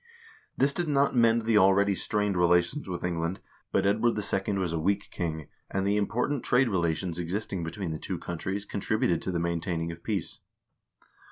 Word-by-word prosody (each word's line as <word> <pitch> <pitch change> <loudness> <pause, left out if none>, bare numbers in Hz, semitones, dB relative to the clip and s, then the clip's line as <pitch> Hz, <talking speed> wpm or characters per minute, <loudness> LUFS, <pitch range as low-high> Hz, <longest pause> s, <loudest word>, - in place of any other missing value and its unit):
This 140 +1 +3
did 175 +1 -1
not 140 -2 +2
mend 115 -1 +4
the 110 -1 +4
already 100 +1 +4
strained 105 0 0
relations 90 +8 +2
with 90 -1 -4
England, 85 +1 -2 0.3
but - - +2
Edward 110 +3 +2
II. 100 0 -1
was 90 -3 -1
a 85 - -1
weak 100 +5 0
king, 80 -3 -4 0.2
and 95 0 -1
the 100 +1 +2
important 120 +6 0
trade 125 0 +3
relations 85 -2 -1
existing 90 +1 -3
between 85 +2 -4
the 80 - -4
two - - -4
countries 95 +4 -4
contributed 100 -4 0
to - - -2
the 85 - -1
maintaining 85 0 -2
of 85 0 -10
peace. 100 -6 -3
95 Hz, 175 wpm, -28 LUFS, 85-105 Hz, 0.3 s, mend